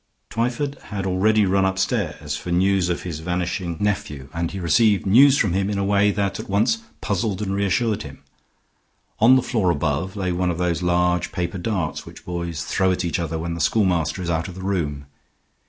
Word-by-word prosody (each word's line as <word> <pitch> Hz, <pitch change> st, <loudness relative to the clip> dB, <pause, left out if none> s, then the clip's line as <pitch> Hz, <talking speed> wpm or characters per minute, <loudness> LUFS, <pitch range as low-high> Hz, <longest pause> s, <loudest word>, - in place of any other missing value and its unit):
Twyford 125 Hz, +5 st, -2 dB
had 100 Hz, -2 st, -4 dB
already 100 Hz, +3 st, +3 dB
run 95 Hz, +1 st, +2 dB
upstairs 95 Hz, -5 st, -1 dB
for 75 Hz, +4 st, -7 dB
news 95 Hz, +1 st, +2 dB
of 90 Hz, -, -2 dB
his 85 Hz, -4 st, -5 dB
vanishing 90 Hz, 0 st, -2 dB
nephew, 75 Hz, -10 st, -2 dB
and 85 Hz, 0 st, -2 dB
he 95 Hz, -, -6 dB
received 100 Hz, +4 st, +3 dB
news 130 Hz, +8 st, +6 dB
of 100 Hz, -, 0 dB
him 95 Hz, +1 st, 0 dB
in 105 Hz, -, -1 dB
a 100 Hz, -, 0 dB
way 100 Hz, +1 st, +3 dB
that 100 Hz, -1 st, -1 dB
at -, -, -7 dB
once 105 Hz, -, +2 dB, 0.2 s
puzzled 100 Hz, -1 st, -1 dB
and 100 Hz, -2 st, -2 dB
reassured 100 Hz, +2 st, 0 dB
him. 70 Hz, -2 st, -10 dB, 1.0 s
On 120 Hz, +4 st, +7 dB
the 130 Hz, -, +3 dB
floor 110 Hz, -7 st, +1 dB
above 80 Hz, +4 st, -1 dB
lay 95 Hz, -3 st, -1 dB
one 90 Hz, +1 st, 0 dB
of 85 Hz, -, -2 dB
those 90 Hz, -1 st, 0 dB
large 90 Hz, 0 st, +1 dB
paper 90 Hz, 0 st, -3 dB
darts 90 Hz, -5 st, -2 dB
which -, -, -13 dB
boys 85 Hz, -3 st, -4 dB
throw 95 Hz, -1 st, +1 dB
at 90 Hz, 0 st, -1 dB
each 85 Hz, -, -1 dB
other 80 Hz, -1 st, -2 dB
when 85 Hz, +1 st, -3 dB
the 85 Hz, -, -4 dB
schoolmaster 90 Hz, -2 st, +1 dB
is 85 Hz, -, -3 dB
out 80 Hz, 0 st, -1 dB
of 90 Hz, -, -9 dB
the 95 Hz, -, -8 dB
room. 75 Hz, -8 st, -2 dB
95 Hz, 200 wpm, -22 LUFS, 85-100 Hz, 1.0 s, On